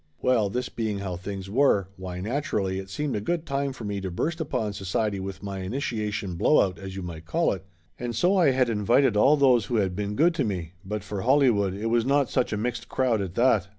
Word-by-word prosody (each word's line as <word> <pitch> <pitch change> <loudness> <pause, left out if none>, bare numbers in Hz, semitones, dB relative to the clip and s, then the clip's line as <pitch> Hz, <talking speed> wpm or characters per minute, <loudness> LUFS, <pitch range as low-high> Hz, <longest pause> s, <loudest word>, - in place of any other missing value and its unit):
Well, 115 -5 +2
this 125 +5 -2
being 110 -3 -3
how 95 -2 -4
things 95 +2 -6
were, 105 -4 +3
why 90 -1 -6
naturally 105 -5 -1
it 95 0 -8
seemed 145 +7 -2
a 105 - -2
good 165 +8 -2
time 140 -1 -1
for 130 - -9
me 100 -1 -3
to 95 - -3
burst 160 - -2
upon 110 -8 -2
society 100 +1 -1
with 95 +1 -6
my 100 -1 -4
initiation 105 -3 -3
blowout 95 - +3
as 95 -1 -7
you 95 - -5
might 85 -2 -8
call 170 +1 +1
it, 95 - -7 0.4
and 120 -1 -3
so 180 - +3
I 175 -6 +5
had 130 -1 +2
invited 115 +3 +3
all 140 +8 +5
who 125 -4 +3
had 95 -4 +1
been 105 +1 -3
good 165 +7 +4
to - - 0
me, 90 -6 -3
but 105 0 -4
for 100 -2 -4
Holly 135 +2 +4
wood, 100 -3 0
it 105 +3 -5
was 120 -1 +3
not 140 +1 +2
such 125 - +1
a 105 - -1
mixed 120 +1 -3
crowd, 125 -5 +1
at 90 -2 -5
that. 120 -7 +3
105 Hz, 230 wpm, -26 LUFS, 95-130 Hz, 0.4 s, I